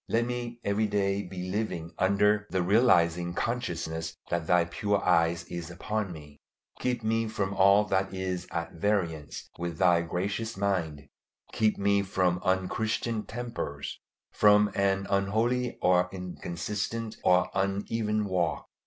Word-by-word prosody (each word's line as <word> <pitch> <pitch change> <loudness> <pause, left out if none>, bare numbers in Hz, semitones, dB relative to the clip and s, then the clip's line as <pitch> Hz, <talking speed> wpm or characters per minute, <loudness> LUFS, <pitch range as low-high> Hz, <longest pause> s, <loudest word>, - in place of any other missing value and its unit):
Let 115 +1 +2
me 120 -1 -4
every 105 +2 +1
day 100 -1 0
be 90 -1 -6
living 95 -6 -3
under 105 +2 +3
the 95 -1 0
realizing 85 -5 +3
consciousness 80 -9 -3
that 85 -2 -1
Thy 90 -1 +4
pure 100 +4 0
eye 85 +1 +3
is 85 -1 -6
upon 100 +3 -3
me. 75 -3 -12 0.4
Keep 125 -2 -1
me 115 +1 +1
from 100 -3 -2
all 100 +2 +5
that 95 -1 0
is 95 -1 -3
at 85 0 -3
variance 85 -6 -2
with 85 -2 -3
Thy 90 -2 +4
gracious 100 +6 -3
mind. 85 -8 -1 0.4
Keep 110 -1 +1
me 100 0 +2
from 90 -2 0
unchristian 105 +4 -1
tempers, 115 -12 -5 0.3
from 105 0 +5
an 95 -1 +1
unholy 110 +5 0
or 90 0 +4
inconsistent 95 +5 -4
or 90 0 +3
uneven 105 +2 0
walk. 90 -3 -1
95 Hz, 135 wpm, -28 LUFS, 85-105 Hz, 0.4 s, all